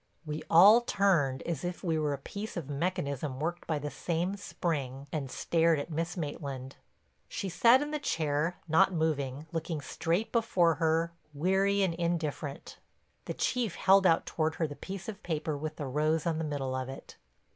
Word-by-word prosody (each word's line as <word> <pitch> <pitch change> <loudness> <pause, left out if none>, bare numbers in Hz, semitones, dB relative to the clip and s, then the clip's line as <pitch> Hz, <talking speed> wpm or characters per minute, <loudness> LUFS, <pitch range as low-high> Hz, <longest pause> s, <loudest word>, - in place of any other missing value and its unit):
We 150 0 -4
all 200 +8 +8
turned, 175 - +2
as 165 -5 -3
if 175 0 -4
we 165 -3 +1
were 150 -2 0
a - - -3
piece 200 +9 -7
of 160 -6 -4
mechanism 140 -3 -2
worked 170 +3 -3
by 160 - 0
the 145 0 -4
same 170 +7 -1
spring, 140 -8 -3
and 145 -4 -3
stared 165 +3 +2
at 145 +4 -5
Miss 165 +4 -2
Maitland. 140 -4 -5 0.5
She 195 - -3
sat 235 - +5
in 295 - -5
the 300 - -1
chair, 155 - 0
not 170 +5 +4
moving, 150 -4 -1
looking 165 -1 -3
straight 170 +7 -1
before 190 -8 +3
her, 165 +1 +2 0.2
weary 195 +5 +2
and 185 -3 +1
indifferent. 165 -4 -3 0.5
The - - -4
Chief 240 -7 0
held 195 0 +5
out 165 - +3
toward 160 -1 -1
her 165 - 0
the 145 -2 -6
piece 190 +3 -7
of 215 -2 -6
paper 155 -4 -2
with 155 +2 -4
the 145 - -5
rose 155 +4 +1
on 165 -2 0
the 160 - -1
middle 140 -3 -2
of 130 0 -3
it. 135 - -9
160 Hz, 180 wpm, -30 LUFS, 145-180 Hz, 0.5 s, all